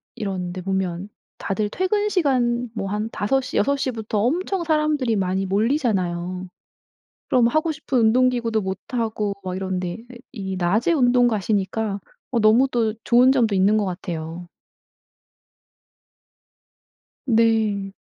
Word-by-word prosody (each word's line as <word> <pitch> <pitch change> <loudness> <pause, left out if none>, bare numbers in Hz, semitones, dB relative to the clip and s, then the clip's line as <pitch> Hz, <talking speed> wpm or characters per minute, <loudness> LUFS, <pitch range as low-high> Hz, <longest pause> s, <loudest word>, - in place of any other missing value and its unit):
이런 185 -4 -4
데 185 - -6
보면 190 0 -2 0.3
다들 205 +1 -2
퇴근시간 285 - 0
뭐 195 -3 -3
한 210 +2 -2
5 265 +6 0
시 - - -4
6 280 +7 +2
시부터 225 -6 -2
엄청 350 - 0
사람들이 305 -7 +1
많이 190 0 0
몰리잖아요. 185 - -1 0.8
그럼 245 -2 +4
하고 310 +6 +1
싶은 290 -4 -2
운동기구도 235 -1 +2
못 190 -1 -3 0.2
하고 220 -4 -1
막 185 0 -4
이런데, 185 -2 -3 0.4
이 195 -6 -5
이 - - -3
낮에 205 - +1
운동 245 -4 +4
가시니까 205 0 -1 0.3
어 240 - 0
너무 220 +5 +5
또 225 -3 0
좋은 250 +2 +5
점도 235 -6 +2
있는 195 +3 +3
것 210 - +1
같아요. 175 -2 -5 2.8
네. 220 -4 +2
220 Hz, 240 characters per minute, -22 LUFS, 190-250 Hz, 2.8 s, 너무